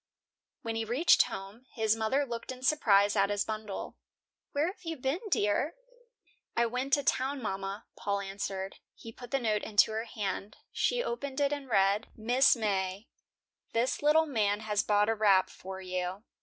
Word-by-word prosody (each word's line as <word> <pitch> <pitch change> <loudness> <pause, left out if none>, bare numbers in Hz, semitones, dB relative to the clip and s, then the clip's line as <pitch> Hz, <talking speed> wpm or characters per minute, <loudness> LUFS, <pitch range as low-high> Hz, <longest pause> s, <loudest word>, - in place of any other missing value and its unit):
When 225 -1 -3
he 225 - -1
reached 250 +10 +4
home, 205 +6 -8
his 220 -1 +2
mother 225 +6 +1
looked 235 0 -5
in 255 0 -9
surprise 205 -8 +4
at 200 -1 +3
his 205 -1 0
bundle. 215 -2 -5 0.5
"Where 290 +2 +1
have 365 +3 -5
you 325 -1 -4
been, 270 +6 -1
dear?" 265 - +1 0.8
"I 235 - +4
went 250 +4 -2
to 285 - +4
town, 270 +2 0
mama," 195 -1 -4
Paul 200 0 -1
answered. 195 0 -5 0.2
He 225 - -10
put 245 +2 -11
the 275 - +1
note 220 -5 0
into 210 0 +3
her 220 +1 -2
hand. 205 -2 -4
She - - +1
opened 285 - -4
it 285 0 +2
and 280 -2 -6
read: 200 0 +3
"MRS. 245 +5 +4
MAY: 195 -1 -1 0.6
This 235 +3 0
little 305 +2 +5
man 215 -7 0
has 210 -1 0
bought 210 0 +2
a 225 - +3
wrap 205 -4 +3
for 190 0 -8
you. 185 +2 -3
220 Hz, 170 wpm, -30 LUFS, 200-265 Hz, 0.8 s, little